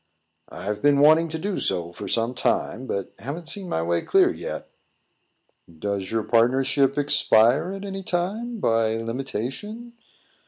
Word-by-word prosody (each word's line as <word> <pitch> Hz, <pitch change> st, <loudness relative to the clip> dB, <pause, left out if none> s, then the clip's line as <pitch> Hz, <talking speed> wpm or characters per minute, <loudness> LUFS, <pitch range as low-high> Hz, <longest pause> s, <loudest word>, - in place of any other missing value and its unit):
"I've 105 Hz, +1 st, -5 dB
been 145 Hz, -1 st, +4 dB
wanting 155 Hz, +3 st, +6 dB
to 160 Hz, 0 st, -4 dB
do 195 Hz, +4 st, -3 dB
so 85 Hz, -2 st, -2 dB
for -, -, -7 dB
some 115 Hz, +1 st, 0 dB
time, 130 Hz, 0 st, -1 dB
but 100 Hz, -5 st, -3 dB
haven't 155 Hz, +6 st, -6 dB
seen 190 Hz, +1 st, -3 dB
my 80 Hz, -, -1 dB
way 85 Hz, 0 st, 0 dB
clear -, -, +4 dB
yet." -, -, -6 dB, 1.1 s
"Does 100 Hz, +2 st, -3 dB
your 110 Hz, -1 st, -1 dB
partnership 130 Hz, +5 st, +2 dB
expire 140 Hz, +1 st, +3 dB
at 195 Hz, +1 st, -7 dB
any 195 Hz, -1 st, -5 dB
time, 205 Hz, +7 st, -3 dB
by 115 Hz, -, +2 dB
limitation?" 135 Hz, -, -5 dB
135 Hz, 145 wpm, -24 LUFS, 110-175 Hz, 1.1 s, wanting